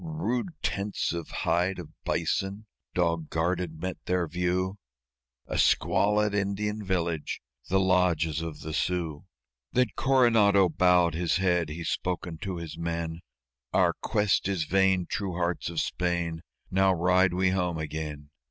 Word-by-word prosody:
Rude 160 -1 -2
tents 100 -2 -1
of 85 -2 -4
hide 90 +3 0
of 85 -4 -8 0.2
bison, 100 +3 -1 0.3
dog 85 -3 0
guarded, 85 -1 -1
met 95 +2 -5
their 90 -1 +1
view 90 +4 -1 0.7
A - - -3
squalid 105 0 +3
Indian 105 +1 -1
village; 85 -5 -1 0.3
the 95 +2 +3
lodges 90 -4 +2
of 80 -2 -6
the 80 0 -5
Sioux! 85 -3 -1 0.5
Then 125 -2 +3
Coronado 115 -8 +4
bowed 90 0 +4
his 85 0 0
head. 90 -4 +1
He 85 +3 -5
spake 90 +1 -2
unto 90 +2 -5
his 85 -2 -7
men: 85 -1 -3 0.5
"Our - - +4
quest 105 -3 +1
is 95 -5 0
vain, 95 +1 +2
true 95 0 -3
hearts 85 0 -1
of 85 -2 -2
Spain! 85 -2 -1 0.3
Now 95 0 +4
ride 90 +1 +3
we 95 0 +2
home 90 -3 0
again. 75 -2 -5
90 Hz, 140 wpm, -28 LUFS, 85-95 Hz, 0.7 s, Coronado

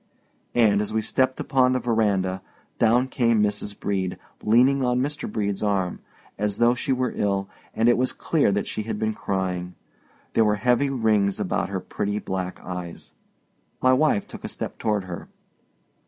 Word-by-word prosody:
And, 105 -4 +4
as 105 - -3
we 110 - +1
stepped 130 +4 +1
upon 130 -1 +3
the 130 - +1
verandah, 100 -6 +1 0.4
down 120 +3 +4
came 115 -4 +2
Mrs. 105 0 -2
Brede, 95 -2 -2 0.2
leaning 130 +5 +4
on 125 0 +2
Mr. 145 +3 -2
Brede's 100 -3 -2
arm, 100 -4 0 0.4
as 105 -1 0
though 120 +1 +4
she 125 +2 -2
were 130 -1 0
ill; 100 -1 0 0.3
and 115 - +2
it 120 - +4
was 130 0 +1
clear 150 -10 +1
that 100 0 0
she - - -3
had 110 0 -4
been 110 +1 0
crying. 90 -3 -3 0.6
There 115 - +4
were 105 -1 +3
heavy 125 +6 +2
rings 110 -6 +1
about - - -1
her - - -2
pretty 105 0 -3
black 95 -3 -4
eyes. 90 -2 -7 0.7
My 130 0 +4
wife 130 -6 +2
took - - -10
a - - -4
step - - -6
toward 105 -3 0
her. 90 -2 -7
105 Hz, 170 wpm, -24 LUFS, 100-125 Hz, 0.7 s, And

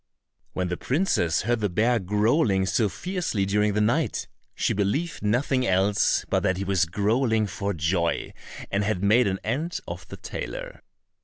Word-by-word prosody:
When 90 -1 -2
the 90 - -2
princess 125 - +1
heard 120 +2 +1
the 105 -2 0
bear 115 +6 +2
growling 105 - +2
so 105 +2 +1
fiercely 180 - -2
during 105 +1 +1
the 105 - +1
night, 115 +3 0 0.3
she - - 0
believed 105 - -1
nothing 130 +5 +1
else 95 +2 +2
but - - +1
that 95 - +1
he 95 - -2
was 95 -3 +2
growling 110 +5 +1
for 100 +1 -3
joy, 85 -1 -1 0.4
and 100 +1 +1
had 100 -2 -1
made 110 +3 +4
an 95 -1 0
end 150 +10 -2
of - - -7
the - - -9
tailor. - - -6
105 Hz, 165 wpm, -25 LUFS, 95-120 Hz, 0.4 s, made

